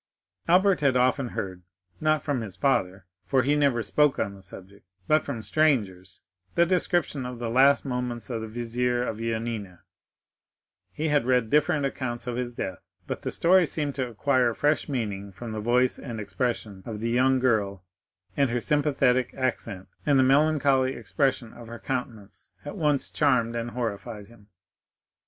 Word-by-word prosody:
Albert 185 +1 +4
had 135 -3 +3
often 130 +1 +2
heard—not 90 - -3
from 140 -5 -1
his 100 -5 -7
father, 95 -9 0 0.2
for 130 -2 +1
he 145 +3 +2
never 140 -6 +2
spoke 150 +2 +2
on 100 - -2
the 100 - -13
subject, 95 +2 -13 0.2
but 155 0 +3
from 120 -6 -5
strangers—the 95 - -1
description 175 -5 0
of 125 0 -6
the 115 -1 -4
last 135 +4 +4
moments 125 -2 -3
of 115 -2 -3
the 110 - -5
vizier 120 +2 -1
of 110 - -3
Yanina; 115 -5 -4 1.1
he 155 +1 -2
had 145 -4 +2
read 125 -3 +2
different 150 0 +2
accounts 130 -3 -4
of 125 -1 -3
his 120 -1 -4
death, 95 - -4 0.3
but - - -5
the - - -3
story 180 0 +4
seemed 145 -2 -2
to 130 -2 -3
acquire 125 0 +1
fresh 150 +1 +1
meaning 100 -7 -3
from 115 +4 -8
the 110 - -4
voice 125 +3 +2
and 120 -5 -6
expression 105 -1 -3
of 110 -2 -5
the 115 +2 -2
young 130 +2 +3
girl, 105 -7 0 0.5
and 140 -2 +2
her 120 +1 0
sympathetic 135 -3 +1
accent 115 -7 -2 0.2
and 145 -2 +3
the 130 - +5
melancholy 135 -1 +3
expression 135 -5 -1
of 120 -1 -12
her 115 +1 -8
countenance 115 -6 -6
at 145 - -6
once 150 -6 +1
charmed 120 -6 +2
and 115 0 -3
horrified 115 -2 -5
him. 105 -1 -19
125 Hz, 165 wpm, -26 LUFS, 110-140 Hz, 1.1 s, the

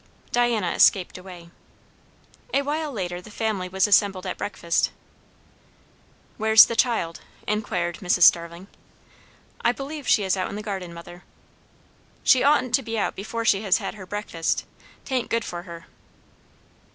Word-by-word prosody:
Diana 235 -7 +1
escaped 190 -3 +3
away. 180 -2 -12 1.0
A 280 - +2
while 300 +1 -2
later 180 -6 -4
the 195 - -14
family 210 -4 -3
was 190 0 +2
assembled 200 -2 +2
at 185 - -3
breakfast. 170 -4 -1 1.5
"Where's 220 0 +7
the 230 - -4
child?" 225 -9 0 0.3
inquired 180 -5 -2
Mrs. 180 -1 +1
Starling. 170 +2 +4 1.0
"I 235 - +3
believe 280 +2 -7
she 210 - +4
is 190 -1 +1
out 185 -1 -2
in - - -6
the 210 - -6
garden, 190 -4 -5
mother." 170 +1 -11 1.0
"She 255 - +5
oughtn't 280 -4 +2
to 270 - +4
be 225 -2 -5
out 210 - -1
before 230 +4 -5
she 200 -3 +3
has 195 -4 +2
had - - -5
her 190 -3 -11
breakfast. 195 -5 -2 0.4
'Tain't 255 -3 -2
good 230 -1 -1
for 175 -1 -6
her." 170 0 -9
200 Hz, 150 wpm, -24 LUFS, 180-230 Hz, 1.5 s, Where's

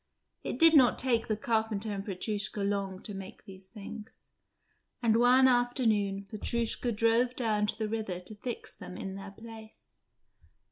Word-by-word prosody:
It - - -4
did 330 -1 +7
not 255 -6 +6
take 240 -3 +1
the 215 -2 -1
carpenter 220 -1 -1
and 195 -1 -4
Petrushka 205 +1 -3
long 200 -1 -2
to 205 - -6
make 195 -1 -9
these 190 -1 -13
things, 215 +1 -10 0.7
and 230 -2 +2
one 250 +3 +6
afternoon 225 -6 +1
Petrushka 235 +3 -2
drove 230 +3 +2
down 215 -4 +1
to - - -2
the 220 - -2
river 215 -5 -3
to 180 +4 -9
fix 230 +3 -6
them 180 - -10
in 190 - -5
their 195 +1 -8
place. 220 +1 -13
220 Hz, 155 wpm, -30 LUFS, 200-235 Hz, 0.7 s, did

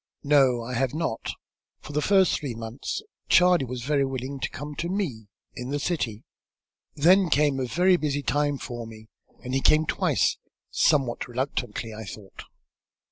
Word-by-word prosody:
"No, 135 -5 +4
I 125 +2 -6
have 130 +3 0
not. 160 -8 -2 0.5
For 150 - -9
the 150 - +1
first 190 +1 +3
three 135 -6 -5
months 115 - -5 0.3
Charley 180 -5 +5
was 125 -1 -6
very 140 +1 +1
willing 135 +1 -4
to - - -2
come 145 +2 -7
to 170 - -2
me, 155 - -3 0.3
in 125 +1 -6
the 145 - -1
city. 125 -9 -2 0.7
Then 180 +5 +5
came 145 -2 +2
a 130 - -1
very 180 +7 +3
busy 145 -3 -2
time 145 +1 +1
for 120 -3 -6
me 110 -1 -13 0.3
and 125 - -5
he 135 - +1
came 155 +3 +4
twice, - - +1 0.3
somewhat 135 -6 +2
reluctantly, 125 -3 -3
I 110 +1 -7
thought. 100 0 -10
135 Hz, 165 wpm, -26 LUFS, 120-150 Hz, 0.7 s, Charley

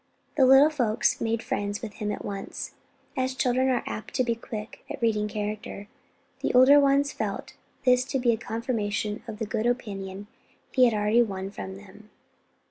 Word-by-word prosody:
The 265 -3 +5
little 270 +4 +7
folks 240 -8 +1
made 225 0 -1
friends 205 +1 -3
with 215 -3 -5
him 210 0 -1
at - - -5
once, 200 -1 -5 0.4
and 260 - +1
as 260 0 -4
children 260 0 +2
are 255 - +1
apt 215 - -6
to 255 - +3
be 235 -1 +1
quick 220 -2 -8
at - - -5
reading 215 -2 +1
character, 210 -1 -5 0.5
the - - 0
older 265 +3 +8
ones 280 0 +3
felt - - -4 0.3
this 250 0 +5
to 270 - -1
be 245 -2 +3
a 225 - 0
confirmation 220 -2 -2
of 210 - -6
the 220 - -3
good 220 +2 -1
opinion 200 -5 -3 0.5
he 255 -1 +5
had 235 -3 +2
already 210 +3 +3
won 195 -3 -2
from 190 -2 -7
them. 205 +2 -15
225 Hz, 185 wpm, -27 LUFS, 210-255 Hz, 0.5 s, older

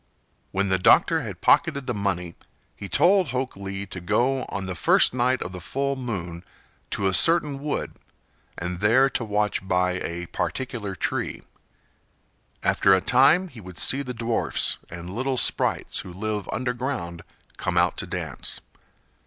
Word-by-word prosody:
When 100 +1 0
the 95 -1 +2
doctor - - +5
had - - -7
pocketed 140 -1 +3
the 125 - -1
money 95 -5 -2 0.4
he 100 - -8
told 180 +4 +4
Hok 130 0 -3
Lee 100 0 -5
to 95 - -8
go 125 +9 +1
on 100 -1 -4
the 95 - -4
first 85 - +4
night 130 +1 +1
of 90 - -7
the 90 -1 -8
full 140 +5 -2
moon 90 -10 -5 0.5
to 100 - 0
a 95 - +1
certain 145 - +4
wood 150 0 -4 0.6
and 90 +1 -4
there 125 +7 +4
to - - -1
watch 105 -2 -1
by 90 0 +1
a 85 +1 -4
particular 110 0 -4
tree. - - -2 1.2
After 95 -1 +4
a - - +2
time 150 - +4
he 120 -8 -12
would 90 -2 -11
see 140 - +3
the 125 -3 -5
dwarfs 115 0 0
and 85 +2 -8
little 130 +3 -1
sprites - - +1
who 90 - -7
live 105 +2 -4
underground 125 -8 -3 0.3
come - - -2
out - - +3
to - - -1
dance. - - -4
105 Hz, 160 wpm, -24 LUFS, 95-130 Hz, 1.2 s, doctor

